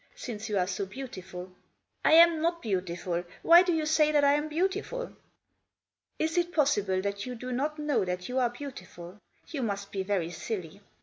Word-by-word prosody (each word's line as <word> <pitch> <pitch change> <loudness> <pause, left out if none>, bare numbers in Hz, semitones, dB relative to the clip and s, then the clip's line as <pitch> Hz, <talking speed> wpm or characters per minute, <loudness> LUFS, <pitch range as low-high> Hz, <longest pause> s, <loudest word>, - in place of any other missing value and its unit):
Since 220 -2 -6
you 210 - 0
are 180 - +2
so 195 +1 -3
beautiful." 190 -6 -8 0.3
" - - -51 0.2
I - - +5
am 335 -1 +7
not 335 +1 0
beautiful. 180 -3 -2 0.2
Why 340 +1 +9
do 365 -1 +1
you 320 -2 0
say 305 0 +3
that 295 -1 +3
I 280 0 +5
am 295 +1 0
beautiful?" 390 +9 -2 0.5
" - - -56
Is 325 +2 0
it 345 0 -1
possible 205 - +2
that 200 +2 -3
you 250 - -5
do 250 +2 -6
not 290 +5 -1
know 295 -6 +1
that 180 0 -3
you 255 +1 -1
are 245 -2 +2
beautiful? 210 -8 -9 0.3
You 295 -5 -4
must 200 -3 -3
be 195 - -2
very 190 -4 -1
silly. 185 +1 -5
245 Hz, 195 wpm, -29 LUFS, 190-305 Hz, 0.5 s, Why